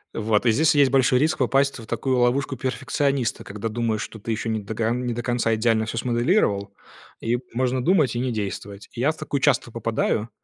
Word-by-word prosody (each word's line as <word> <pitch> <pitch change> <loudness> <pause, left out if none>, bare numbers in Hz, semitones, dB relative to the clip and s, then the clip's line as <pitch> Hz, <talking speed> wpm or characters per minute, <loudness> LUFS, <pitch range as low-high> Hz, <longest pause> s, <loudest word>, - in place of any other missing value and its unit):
Вот 110 0 +1
и 115 - +5
здесь 155 +7 +3
есть 140 -2 +4
большой 130 -2 +4
риск 155 +4 +1
попасть 135 +1 +2
вот 115 - -9
в - - -25
такую 130 -2 0
ловушку 130 +3 +1
перфекциониста, 130 0 -1
когда 105 +2 -5
думаешь, 110 -1 -1
что 110 - -9
ты 115 +3 -4
еще 110 +1 -2
не 110 -1 0
дога 110 +2 -2
не 125 0 -2
до 120 +1 -4
конца 120 -2 +1
идеально 110 0 +1
всё 115 - -4
смоделировал, 120 - +1 0.5
и 120 +2 0
можно 130 +1 0
думать 155 -6 +3
и - - -1
не 125 0 -1
действовать. 100 -1 -5
Я 135 +6 +1
в 160 - -12
такую 140 - -3
часто 130 -4 +2
попадаю 115 -1 -1
120 Hz, 205 wpm, -23 LUFS, 110-130 Hz, 0.5 s, и